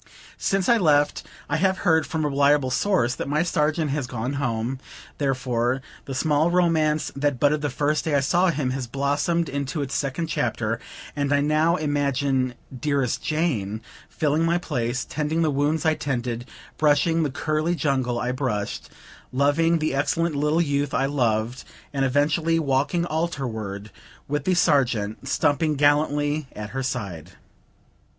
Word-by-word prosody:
Since 195 -2 0
I 235 - +5
left, 145 -5 +3 0.3
I 155 - 0
have 190 +3 +2
heard, 160 -2 +3
from 160 -3 -2
a - - +2
reliable 140 -1 +3
source, 125 -4 +2
that - - -5
my 150 +2 +2
Sergeant 155 -3 0
has 140 -3 -2
gone 125 +2 -3
home; 120 +1 -2 0.4
therefore, 130 -2 0 0.3
the 135 - -5
small 150 +3 +2
romance 160 -4 +2
that 140 -2 0
budded 145 +2 +2
the 145 - -1
first 145 +2 0
day 155 -3 +1
I - - +4
saw 175 +7 +3
him, 145 -5 -1
has 130 -1 -3
blossomed 145 +6 0
into 140 +2 -3
its 140 - -5
second 140 +4 -1
chapter; 120 -8 -1 0.4
and 145 -1 -1
I 145 - +4
now 155 +3 +2
imagine 140 -4 0 0.2
"dearest 140 -2 0
Jane" 125 - -1 0.3
filling 155 +1 0
my 170 +1 +2
place, 125 -7 -2
tending 155 +2 -1
the 155 - +2
wounds 145 +4 0
I 160 - +4
tended, 120 -4 -3 0.3
brushing 155 +2 +3
the 155 - +1
curly 155 +4 -1
jungle 130 -5 0
I 125 - -1
brushed, 125 -6 -3 0.4
loving 145 +5 +2
the 155 -2 -1
excellent 155 +3 0
little 150 +3 +2
youth 140 -2 -1
I 135 - +2
loved, 120 -3 0 0.3
and 135 -1 0
eventually 150 +5 +2
walking 145 +3 +1
altarward, 115 - -3 0.4
with 145 0 -2
the 185 - +2
Sergeant 120 - +1
stumping 150 +1 +1
gallantly 145 0 +2
at 105 0 -6
her 135 - -3
side. 95 -10 -4
145 Hz, 155 wpm, -24 LUFS, 130-155 Hz, 0.4 s, I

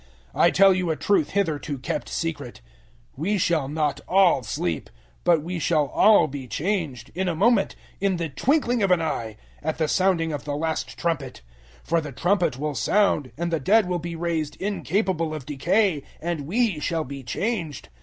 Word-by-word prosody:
015:051 - - -1
I 170 - +7
tell 195 +2 +6
you 180 -2 -1
a 160 - +1
truth 180 -2 +1
hitherto 160 -7 -1
kept 130 - -4
secret: 145 - -4 0.5
we 190 +9 0
shall 165 -6 +1
not 150 0 -1
all 185 -7 +4
sleep, 90 -8 -3 0.3
but 165 -4 +3
we 175 +1 -4
shall 150 -3 +1
all 215 0 +5
be 135 -2 -6
changed, 145 - -2
015:052 - - -16
in 190 0 0
a 170 - 0
moment, 210 +3 +3 0.2
in 195 -2 +1
the 170 -1 -2
twinkling 245 - +1
of 195 - +2
an 180 -1 +4
eye, 115 -9 -3 0.2
at 155 - -2
the 160 -1 +1
sounding 170 -2 +1
of 145 - -4
the 145 -1 -3
last 160 +1 -3
trumpet; 150 -7 -2 0.4
for 170 0 +1
the 150 -2 -7
trumpet 175 - +1
will 150 +1 -2
sound, 195 -5 +1
and 170 +1 -2
the 165 - +1
dead 205 +8 +3
will 180 -1 -1
be 170 +1 -5
raised 165 -3 -2
incapable 190 -4 -1
of 145 -5 -7
decay, 165 +4 +1 0.2
and 160 -4 -3
*we* 215 -3 +1
shall 165 +1 -1
be 140 -1 -7
changed. 165 - -3
165 Hz, 185 wpm, -24 LUFS, 145-190 Hz, 0.5 s, I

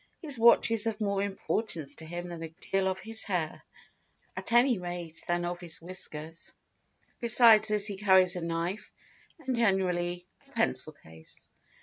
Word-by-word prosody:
His 300 -5 -10
watch 235 -1 +5
is 225 -1 +4
of 220 -1 -3
more 200 -2 -1
importance 190 -6 -2
to 160 - -11
him 175 +1 -6
than 170 -1 -8
a 165 - -5
good 160 - -22
deal 195 0 +1
of 190 0 -1
his 220 +3 -4
hair, 175 -6 -3 0.7
at - - -3
any 240 -2 +4
rate 175 -2 -5
than 175 0 -1
of 175 0 -4
his 170 -2 -4
whiskers; 165 -2 -2 0.7
besides 230 -2 +6
this 210 -1 +4
he 205 -2 -3
carries 190 -2 +4
a 180 - -4
knife, 170 +4 -4 0.5
and 260 -1 -1
generally 180 -5 0 0.2
a - - -24
pencil - - -1
case. 80 0 -14
185 Hz, 165 wpm, -29 LUFS, 175-215 Hz, 0.7 s, besides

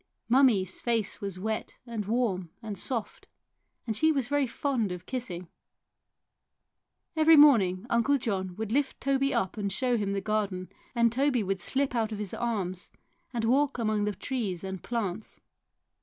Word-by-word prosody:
Mummie's 230 -8 +3
face 230 -4 -1
was 195 -2 -3
wet 220 +3 -3
and 230 -4 -4
warm 210 -7 0
and 215 -2 -4
soft, 225 +3 -3 0.6
and 220 -2 -2
she 315 +8 +4
was 270 -5 -1
very 290 -2 +2
fond 235 -5 -1
of 180 0 -6
kissing. 185 -9 -5 1.7
Every 320 0 +6
morning 220 -10 +6
Uncle 240 +5 +3
John 190 -7 -2
would 220 +1 -4
lift 275 +2 0
Toby 275 0 +1
up 230 -5 -1
and 200 -2 -2
show 245 +4 +1
him 200 -2 -1
the 200 - 0
garden, 200 -3 -2 0.3
and 235 -1 +4
Toby 260 -1 +2
would 195 -1 -2
slip 270 +8 0
out 225 -2 0
of 215 - -3
his 205 -2 -5
arms 195 -6 -2 0.4
and 230 -2 -1
walk 275 +4 +2
among 215 -3 0
the 210 -1 -2
trees 200 -7 -3
and 190 -2 -5
plants. 220 -4 -4
220 Hz, 160 wpm, -29 LUFS, 195-255 Hz, 1.7 s, Every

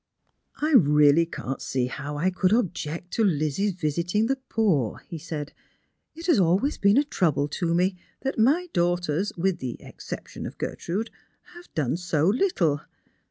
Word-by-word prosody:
" - - -49
I - - 0
really 150 - +5
can't 135 -4 -5
see 130 -2 -1
how 145 +3 -5
I 180 +5 +1
could 185 0 +1
object 180 -6 -1
to 225 - +1
Lizzie's 170 +2 +1
visiting 175 +5 0
the 270 +3 0
poor," 165 - +1
he 165 -3 -6
said. 150 -2 -6 0.3
" - - -49
It 330 +1 -8
has 330 - +4
always 190 - +2
been 200 +3 +4
a 285 - +5
trouble 160 - +1
to 165 +2 -1
me 180 +1 +1 0.2
that 270 -3 -2
my 300 +11 +3
daughters, 175 +1 0
with 185 +1 0
the 125 -2 -4
excejition - - -8
of - - -10
Gertrude, 205 +7 -3 0.4
have 350 0 -14
done 150 0 0
so 165 -4 0
little. 190 - +2
175 Hz, 165 wpm, -25 LUFS, 150-210 Hz, 0.4 s, really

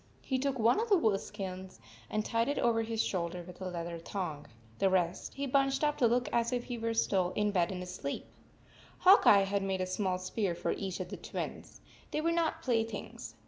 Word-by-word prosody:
He 260 -1 -1
took 275 0 0
one 235 - +4
of 460 +1 -1
the 400 - +6
wolf 215 - +2
skins 190 - -7 0.3
and 215 0 -1
tied 230 +1 +1
it 285 - -1
over 230 -1 +2
his 225 0 -1
shoulder 175 -1 -2
with 180 +1 -12
a 185 - -3
leather 170 -1 -5
thong. 165 -4 -5 0.3
The 195 - +4
rest 180 -1 0
he 280 - -2
bunched 275 +1 +2
up 295 0 +2
to 245 - +5
look 245 +2 +1
as 235 0 +2
if 245 -1 -1
he 245 -1 -5
were 230 0 -1
still 185 -5 +2
in 210 0 +1
bed 180 -3 +1
and 180 -1 -4
asleep. 180 -6 -5 0.7
Hawk 380 +2 +6
Eye 200 -1 +8
had 200 +1 0
made 195 -1 -1
a - - +1
small 185 0 -1
spear 185 0 -2
for - - -1
each 190 -3 -3
of 185 - -5
the - - -6
Twins. - - -6 0.3
They - - -2
were 330 +2 +1
not 335 -1 0
play 235 -3 +2
things. 225 - -7
210 Hz, 225 wpm, -32 LUFS, 185-245 Hz, 0.7 s, Eye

